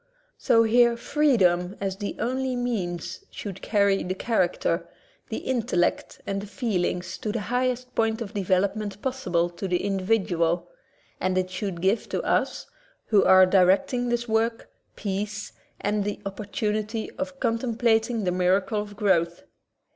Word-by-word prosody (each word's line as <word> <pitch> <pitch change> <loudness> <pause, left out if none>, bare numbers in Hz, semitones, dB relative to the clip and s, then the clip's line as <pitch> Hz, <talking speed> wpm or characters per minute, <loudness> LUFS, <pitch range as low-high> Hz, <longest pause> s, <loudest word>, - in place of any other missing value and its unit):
So 230 0 +4
here 235 +1 +4
freedom 200 -10 +2
as 195 -1 -2
the 205 0 -4
only 260 +1 -1
means 200 -9 -3
should 195 -2 -7
carry 200 -2 +2
the 185 +1 -3
character, 190 -4 0 0.4
the - - -3
intellect, 235 -8 -1
and 195 0 -2
the 205 - -8
feelings 190 -4 -2
to 215 - -2
the 230 0 -2
highest 250 0 0
point 225 0 +1
of 225 -2 -6
development 200 +1 0
possible 185 -11 0
to 190 +3 -5
the 180 -1 0
individual, 185 -4 +1 0.5
and 185 0 0
it 185 0 0
should 185 -2 -4
give 195 +4 +1
to - - -2
us, - - 0 0.4
who 210 -3 +5
are 185 0 +7
directing 200 +7 +3
this 240 0 -1
work, 225 +1 0 0.2
peace 205 +1 -3 0.3
and 205 0 0
the 205 0 -3
opportunity 215 +1 -3
of 280 -1 -4
contem 230 0 -1
plating 230 -1 +2
the 180 - +1
miracle 185 +4 +1
of 205 0 -9
growth. 175 -4 +1
205 Hz, 145 wpm, -26 LUFS, 185-230 Hz, 0.5 s, are